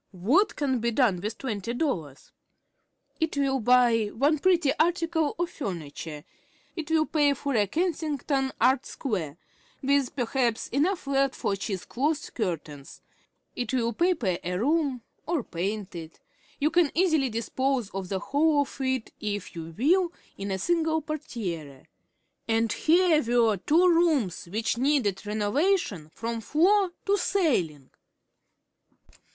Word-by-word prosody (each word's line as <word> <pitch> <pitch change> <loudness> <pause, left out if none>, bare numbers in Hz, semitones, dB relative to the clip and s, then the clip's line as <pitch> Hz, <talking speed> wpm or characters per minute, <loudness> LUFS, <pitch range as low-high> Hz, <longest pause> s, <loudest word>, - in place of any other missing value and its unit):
What 300 - +3
can 265 -4 0
be 235 +1 0
done 225 -7 +2
with 215 +3 -4
twenty 230 -3 -4
dollars? 165 - -3 0.9
It 320 -3 -1
will 270 -1 +1
buy 240 -1 +4
one 280 +9 +1
pretty 345 -5 +3
article 330 -2 +1
of 345 0 -2
furniture. 160 - -6 0.5
It 325 -3 -5
will 320 -1 +3
pay 290 -3 +2
for 280 0 -3
a 210 -4 +2
"Kensington 295 - -1
Art 260 +1 +3
Square," 175 - -4 0.5
with 275 -1 +1
perhaps 245 -2 0
enough 330 +8 0
left 275 -1 +1
for 200 - -1
cheese 195 -1 -4
cloth 290 +4 -2
curtains. 155 - -5 0.5
It 250 +1 -2
will 235 -2 0
paper 245 - +1
a 180 +1 -2
room, 275 - 0 0.2
or 325 -6 0
paint 195 +3 -4
it. 165 -2 -9 0.4
You 300 +2 +2
can 345 -4 +4
easily 315 -6 +3
dispose 245 +1 -1
of 190 -1 -5
the 195 - -1
whole 290 +8 +2
of 280 0 -5
it, 260 -3 -1
if 205 -2 -4
you 165 -1 -7
will, 345 +7 +3 0.2
in 200 0 -5
a 190 - -1
single 320 - 0
portière. 180 - -5 0.6
And 225 -1 +1
here 335 -1 +4 0.2
were 220 -3 +3
two 330 - +3
rooms 325 - +2
which 220 +2 -1
needed 245 -8 +1
renovation 210 - 0
from 230 +6 -4
floor 370 - +3 0.2
to 405 0 +3
ceiling! 185 - 0
260 Hz, 135 wpm, -27 LUFS, 205-310 Hz, 0.9 s, buy